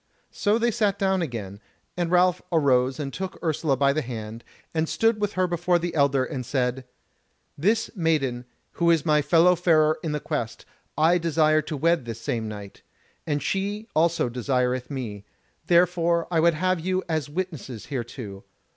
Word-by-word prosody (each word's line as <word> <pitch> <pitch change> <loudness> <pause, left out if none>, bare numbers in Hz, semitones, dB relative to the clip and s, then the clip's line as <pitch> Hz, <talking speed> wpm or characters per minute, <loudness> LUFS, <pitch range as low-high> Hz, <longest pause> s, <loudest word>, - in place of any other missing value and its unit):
So 210 +1 +1
they 235 +1 +1
sat 210 -3 +1
down 190 -1 +1
again, 105 - -5 0.4
and 175 -2 -1
Ralph 180 0 +3
arose 130 -5 +2
and 140 -2 -4
took 190 0 -5
Ursula 155 -4 0
by 140 +1 +3
the 155 - 0
hand, 115 -3 -7 0.3
and 160 -1 0
stood 225 -1 +1
with 205 -1 0
her 185 0 +1
before 175 0 +1
the 170 0 -3
elder, 140 -3 +2
and 130 -2 -5
said: 125 0 -1 0.7
"This 215 +11 0
maiden, 140 -8 0 0.3
who 170 -1 +1
is 165 -4 +3
my 150 -2 +3
fellow 170 +4 +4
farer 155 -3 +3
in 160 - -3
the 150 - -1
Quest, 140 -8 -4 0.3
I 165 +3 +4
desire 155 -2 +3
to 155 0 -5
wed 165 -2 +2
this 115 -1 -6
same 115 -1 -3
night, 105 -2 -9 0.5
and 145 -3 -1
she 205 +6 -2
also 165 -2 +2
desireth 125 0 -1
me: 115 -8 -5 0.4
therefore 170 -1 +3
I 165 - +2
would 170 0 +4
have 185 +2 +1
you 185 +3 -1
as 155 -4 -2
witnesses 150 - -5
hereto. 120 -6 -6
155 Hz, 170 wpm, -25 LUFS, 130-175 Hz, 0.7 s, fellow